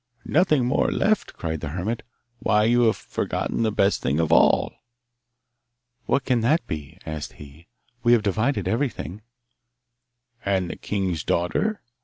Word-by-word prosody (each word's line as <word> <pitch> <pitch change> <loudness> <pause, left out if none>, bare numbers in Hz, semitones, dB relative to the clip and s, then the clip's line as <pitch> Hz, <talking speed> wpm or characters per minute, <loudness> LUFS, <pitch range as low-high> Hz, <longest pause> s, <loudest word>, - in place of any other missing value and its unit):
'Nothing 155 -5 +3
more 125 - +1
left!' 215 0 +1
cried 80 -2 -4
the 80 - -3
hermit. 95 +9 -3 0.4
'Why, 105 -1 +3
you 120 +2 +4
have 110 - +2
forgotten - - -3
the 110 -1 +2
best 100 -1 +2
thing 70 +4 0
of 80 - +1
all!' - - +4 1.3
'What 140 - +1
can 125 -3 +2
that 150 +9 +2
be?' 75 -3 -6
asked 80 -1 -5
he. 75 +3 -14 0.3
'We 120 +1 +4
have 115 -3 +4
divided 105 0 0
everything.' 110 -4 -2 1.2
'And 95 -3 0
the - - -6
king's 95 -7 -2
daughter? 205 - 0
105 Hz, 145 wpm, -24 LUFS, 85-120 Hz, 1.3 s, you